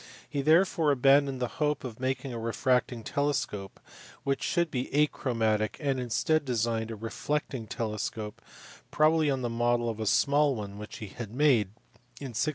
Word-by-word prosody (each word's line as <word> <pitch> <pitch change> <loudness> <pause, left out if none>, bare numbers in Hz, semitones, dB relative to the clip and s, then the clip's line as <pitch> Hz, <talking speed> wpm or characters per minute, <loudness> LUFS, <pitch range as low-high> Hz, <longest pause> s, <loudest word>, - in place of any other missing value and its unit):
He 140 - -2
therefore 160 +1 +4
abandoned 135 0 +4
the 125 - 0
hope 150 0 +1
of 120 -3 -7
making 130 0 -2
a 115 - -4
refracting 120 +1 0
telescope 140 -8 -2 0.4
which 140 0 0
should 170 -2 0
be 125 -1 -2
achromatic, 115 -7 +1
and 140 -3 0
instead 145 +6 +1
designed 115 -3 -1
a 115 - -5
reflecting 115 +2 -3
telescope, 105 -1 -4 0.5
probably 155 0 +3
on 135 -2 -1
the - - 0
model 120 0 +1
of 110 - -9
a 110 - -2
small 140 +4 +3
one 100 -2 -6
which 105 - -8
he 105 - -7
had 115 +1 -7
made 125 -4 +3 0.5
in 135 -4 -6
1668. 140 +7 +1
125 Hz, 165 wpm, -29 LUFS, 115-145 Hz, 0.5 s, therefore